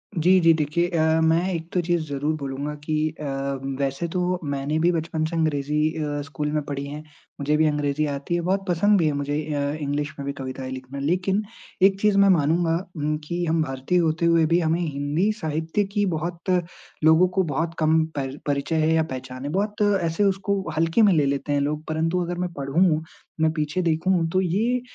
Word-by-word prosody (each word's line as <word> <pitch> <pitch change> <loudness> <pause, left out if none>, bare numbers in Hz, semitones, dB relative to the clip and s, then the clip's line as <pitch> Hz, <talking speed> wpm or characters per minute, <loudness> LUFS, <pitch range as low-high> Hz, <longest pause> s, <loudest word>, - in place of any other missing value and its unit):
जी, 180 +3 +4
जी 165 -1 +5
देखिये 160 +3 0
अ, 160 -1 +2
मैं 165 +3 +3
एक 165 0 -4
तो 180 - +2
चीज़ 175 -1 0
जरूर 145 +3 -1
बोलूँगा 140 +2 -4
कि 155 0 0
अ, 150 - -5 0.5
वैसे 140 +5 -1
तो 180 +1 -1
मैंने 140 +1 -2
भी 175 +2 +3
बचपन 160 -1 -1
से 165 +1 -4
अंग्रेजी 150 -2 0 0.2
अ, 145 -1 -2
स्कूल 150 +1 -3
में 150 - 0
पढ़ी 140 -1 -4
हैं। 150 +2 -7 0.4
मुझे 145 +2 +1
भी 160 - +3
अंग्रेजी 145 0 0
आती 140 +4 -3
है, 175 - 0
बहुत 190 +3 0
पसंद 200 +4 +3
भी 160 - +2
है 150 - +2
मुझे 145 0 -2 0.2
अ, 145 - -1 0.2
इंग्लिश 145 +1 -2
में 140 - -4
भी 140 - -2
कविताएँ 130 -1 -6
लिखना। 130 +1 -7
लेकिन 185 +7 0 0.4
एक 195 0 +5
चीज़ 210 -2 +3
मैं 200 0 +6
मानूँगा 165 0 +3 0.2
ऊँ, 150 +1 -1
कि 175 +3 -3
हम 165 0 +1
भारतीय 135 +5 -1
होते 165 0 +1
हुए 165 -1 +4
भी 170 +2 +3
हमें 165 +1 +1
हिंदी 150 +6 0
साहित्य 160 +5 -1
की 205 -1 +2
बहुत 170 +3 -5 0.5
लोगों 160 +3 +6
को 190 - +4
बहुत 165 +2 -2
कम 160 0 +3
पर 135 0 -3
परिचय 145 +2 -1
है 160 - +2
या 160 - +3
पहचान 130 0 -6
है। - - -2
बहुत 205 +3 -1 0.2
ऐसे 165 +5 0
उसको 195 0 +1 0.2
हल्के 165 +7 +3
में 205 -4 +6
ले 150 -3 +3
लेते 140 +1 -1
हैं 140 - +2
लोग, 150 +2 -2
परंतु 165 +3 0
अगर 175 +1 -4
मैं 180 -1 -2
पढ़ूँ, 155 +3 +1 0.4
मैं 160 0 +3
पीछे 155 +3 -1
देखूँ, 165 +1 +1
तो 185 +2 +1
ये 220 +8 0
160 Hz, 205 wpm, -24 LUFS, 145-175 Hz, 0.5 s, मैं